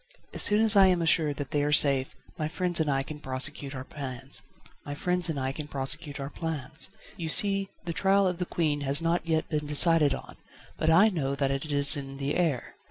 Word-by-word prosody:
"As - - +4
soon 210 +2 +8
as 220 -1 +2
I 195 -1 +6
am 180 -2 +2
assured 160 -3 +1
that 140 -2 -7
they 145 -1 0
are 145 - -1
safe, 140 -3 +3 0.2
my 155 - -3
friends 175 +1 -1
and 155 -2 0
I 135 -1 0
can 150 +2 -9
prosecute 135 +1 -1
our 130 - -6
plans. 135 -1 -6 0.4
You 150 +2 -3
see 195 +3 +2 0.2
the 170 - -4
trial 195 +3 +2
of 180 -1 -2
the 180 - -3
Queen 150 -4 -1
has 140 +1 +3
not 165 0 -2
yet 160 -1 -1
been 150 -1 -3
decided 150 0 +4
on, - - -12 0.4
but - - -1
I 185 +7 +5
know 140 -8 -3
that 135 -1 -1
it 135 +3 -4
is 140 +1 +2
in 135 -1 -7
the 140 +1 -3
air. 160 -9 -2
150 Hz, 185 wpm, -27 LUFS, 140-170 Hz, 0.4 s, soon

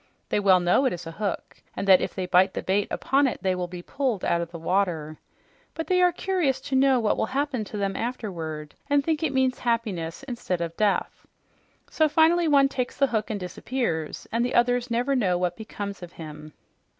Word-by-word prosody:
They - - +1
all 190 -2 +5
know 180 +10 +3
it 255 - +2
is 175 -1 -7
a 165 - -6
hook 200 +4 -4
and 200 - -3
that 190 -1 +7
if - - -3
they 185 - -2
bite 185 +1 +3
the - - -3
bait 200 +2 +1
upon 275 +1 +2
it 245 - -4
they 190 -1 +2
will 180 -1 -3
be 175 0 -8
pulled 255 -6 -2
out 170 - +1
of 170 - -4
the 170 - -8
water. 165 -3 -1 0.6
But 325 - -3
they 365 -1 +2
are 360 0 +5
curious 345 -7 0
to 265 - -3
know 265 -1 +4
what 220 -3 +1
will - - 0
happen 270 -2 -1
to 210 - -7
them 195 -1 -1
afterward, 165 - -4 0.2
and 285 0 +3
think 315 0 0
it 315 -4 0
means 260 -1 +1
happiness 220 -6 -2
instead 240 -9 -3
of 170 -1 -4
death. 210 -2 0 0.6
So 315 -1 +2
finally 325 +3 +4
one 280 -2 +5
takes 255 -2 -3
the 280 - +4
hook 220 -5 -2
and 215 -2 -2
disappears, 180 - -3
and 230 +1 +1
the 245 - -1
others 245 +1 +2
never 245 +4 +1
know 190 -8 +2
what 175 -1 -1
becomes 205 -3 -6
of 175 -1 -9
him." 155 -1 -10
215 Hz, 215 wpm, -25 LUFS, 180-265 Hz, 0.6 s, that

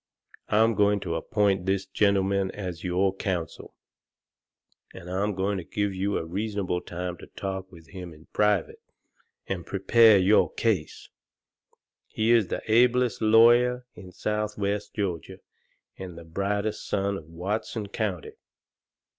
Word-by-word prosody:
I'm 110 +2 +4
goin' 105 0 +3
to - - -3
appoint 95 +2 0
this 95 0 0
gentleman 100 -1 +1
as 90 -4 -6
your 95 +2 +1
counsel, 90 -5 -4 1.2
and 85 - -10
I'm 100 +3 -1
goin' 95 +1 -1
to - - -6
give 100 +1 -2
you 100 +2 -1
a - - -3
reasonable 95 0 -2
time 90 0 -5
to - - -12
talk 95 -1 -6
with 80 -3 -15
him 90 -2 -8
in 80 0 -16
private 105 -4 +1 0.6
and 90 -3 -4
prepare 105 +4 +5
your 95 +3 +4
case. 100 -9 -1 1.0
He 110 +1 0
is 115 -5 +4
the - - -4
ablest 120 +1 +3
lawyer 120 +3 +5
in 90 0 -12
southwest 105 0 -2
Georgia 90 -7 -3 0.6
and 90 -3 -8
the 85 - -9
brightest 100 +5 -2
son 100 0 0
of 85 - -8
Watson 100 +6 -4
County." 100 -6 -3
100 Hz, 135 wpm, -26 LUFS, 90-105 Hz, 1.2 s, prepare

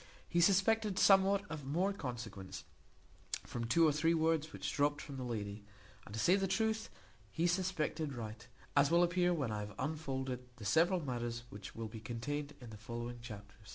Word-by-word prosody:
He 170 - +2
suspected 200 +2 +4
somewhat 195 0 +6
of 160 -5 -6
more 175 +9 +1
consequence, 120 - -6 0.8
from 120 -1 -4
two 160 +8 +5
or - - +4
three 165 +3 +2
words 160 -1 +1
which - - -4
dropt 145 0 +2
from 140 -3 -7
the 130 - -4
lady; 105 -4 -4 0.4
and, 100 - -10
to - - -2
say 180 +10 +5
the 195 -1 +1
truth, 220 +3 0 0.4
he 165 - 0
suspected 170 -5 0
right, 110 -2 -7 0.3
as 140 0 +5
will 170 +1 +5
appear 175 +1 +3
when 140 -9 0
I 105 - -2
have 105 -1 -6
unfolded 135 -5 -2 0.2
the 115 -4 -9
several 170 - +4
matters 120 -2 -3
which 100 -1 -9
will 115 0 -4
be 110 +1 -8
contained 140 +6 -4
in 120 -3 -10
the 105 - -8
following 120 +2 -5
chapter. 105 -3 -9
145 Hz, 185 wpm, -35 LUFS, 115-175 Hz, 0.8 s, somewhat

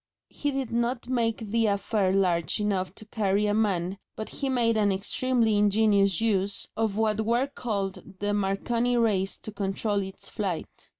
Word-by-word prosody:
He 290 - -2
did 270 -3 -2
not 235 +1 -1
make 230 -4 -1
the 225 0 +3
affair 200 -1 +1
large 180 -3 +1
enough 195 -3 -1
to 215 - -9
carry 210 -2 +1
a 205 - +1
man, 195 -3 0 0.2
but 215 - -5
he 275 - -3
made 235 -3 +2
an 205 -2 +3
extremely 225 +3 +1
ingenious 205 -2 +3
use 200 -3 0
of 220 -2 0
what 220 -1 +1
were 235 +3 +2
then 280 - -14
called 200 -6 -4
the 205 +1 -1
Marconi 230 +5 0
rays 200 -5 +1
to 215 - -8
control 200 +1 -1
its 190 0 -7
flight. 195 -7 -5
210 Hz, 170 wpm, -27 LUFS, 195-230 Hz, 0.2 s, the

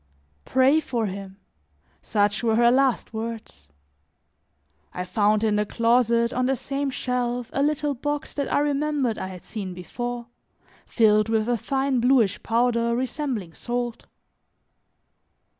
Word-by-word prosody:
"Pray 265 +4 +4
for 245 -7 -2
him," 195 -1 -6 0.6
such 205 -1 +1
were 225 -2 +2
her 235 +1 +5
last 265 -2 +1
words. 220 - -6 1.3
I 180 - -3
found 210 +3 +2
in 215 -1 +2
the 210 - +1
closet, 235 0 +2
on 255 0 +1
the 270 - +2
same 275 +2 -3
shelf, 245 -2 -2
a 275 - 0
little 295 0 +1
box 290 +3 -3
that 280 -1 -3
I - - +3
remembered 290 -4 0
I - - -4
had 185 -2 -9
seen 195 -5 -6
before, 240 +7 -5 0.6
filled 215 -2 +3
with 220 -1 +1
a 240 - +2
fine 270 +3 0
bluish 240 -5 +3
powder 235 0 +1
resembling 255 - -3
salt. 240 +2 -4
235 Hz, 135 wpm, -24 LUFS, 215-265 Hz, 1.3 s, her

